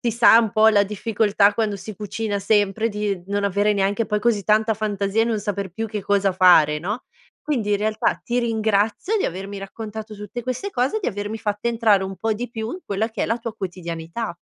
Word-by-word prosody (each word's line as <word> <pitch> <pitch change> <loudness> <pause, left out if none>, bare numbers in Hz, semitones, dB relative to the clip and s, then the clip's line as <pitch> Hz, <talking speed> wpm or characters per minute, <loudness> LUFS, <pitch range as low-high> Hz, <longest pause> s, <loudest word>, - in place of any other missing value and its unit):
si 235 - 0
sa 230 0 +6
un 225 -2 +2
po' 220 0 +5
la 205 -2 +5
difficoltà 205 0 +2
quando 215 -2 0
si 200 +3 -8
cucina 210 0 -3
sempre 205 +2 +1
di 205 -3 -2
non 200 0 -1
avere 205 +2 +2
neanche 200 +3 +1
poi 210 -1 -1
così 215 -3 +1
tanta 220 +2 +3
fantasia 205 0 0
e - - +2
non 225 -2 -1
saper 200 -2 -3
più 225 +5 -4
che 210 -1 -5
cosa 200 -1 +2
fare, 175 -5 +5
no, 205 +10 -4 0.4
quindi 240 -9 -2
in 205 - +2
realtà 215 +1 0
ti 240 +1 -1
ringrazio 220 - +1
di 415 - 0
avermi 195 +3 -4
raccontato 215 +2 -7
tutte 210 +4 -7
queste 255 - -3
cose 260 - 0
e - - -2
di - - -3
avermi 205 +2 -4
fatta 210 +1 -2
entrare 220 -4 +3
un 190 0 -6
po' 220 +4 -1
di 240 +3 -5
più 225 -1 -4
in 370 - -7
quella 205 +3 -1
che 220 - -3
è - - 0
la 230 - 0
tua 230 -2 -6
quotidianità. 170 +1 -5
210 Hz, 220 wpm, -22 LUFS, 200-225 Hz, 0.4 s, sa